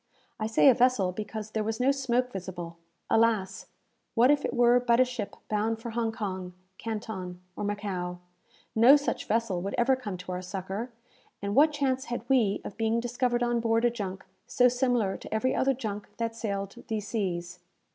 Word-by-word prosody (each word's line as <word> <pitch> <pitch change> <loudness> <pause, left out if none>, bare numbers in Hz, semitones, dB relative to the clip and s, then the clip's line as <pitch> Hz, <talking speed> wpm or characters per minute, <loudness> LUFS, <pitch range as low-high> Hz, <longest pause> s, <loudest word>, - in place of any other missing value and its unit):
I 215 - -1
say 225 +5 +4
a 265 - +9
vessel 240 -7 +3
because 215 +2 -6
there 215 -1 -1
was 220 +2 -2
no 260 +2 +4
smoke 255 -2 0
visible. 175 -3 -6 0.3
Alas! 220 -4 +1 0.5
what 245 +4 +6
if 290 -1 +2
it - - -2
were 240 0 +5
but 240 -1 +2
a 255 - +6
ship 245 -5 -5
bound 220 +1 0
for 235 0 -6
Hong 230 0 0
Kong, 190 -5 -4 0.3
Canton, 210 -5 -5 0.2
or - - -4
Macao? 195 -4 -3 0.6
No 240 +6 +8
such 290 0 -1
vessel 220 -5 0
would 195 +2 -3
ever 255 +2 +4
come 210 -8 -5
to 180 +1 -8
our 180 0 -3
succour, 195 +5 -5 0.5
and 200 0 -3
what 295 +6 +6
chance 270 -2 0
had 240 -1 -5
we 230 -7 +3
of - - -7
being 225 +1 +1
discovered 245 0 0
on 240 0 +1
board 230 0 +2
a 240 - +4
junk 195 -5 -5 0.2
so 250 - +4
similar 245 -5 +1
to - - -11
every 235 +4 +1
other 270 0 +2
junk 210 -4 -5
that 230 -1 -2
sailed 200 -3 -3
these 215 -3 -3
seas? 180 -5 -3
225 Hz, 185 wpm, -28 LUFS, 200-245 Hz, 0.6 s, a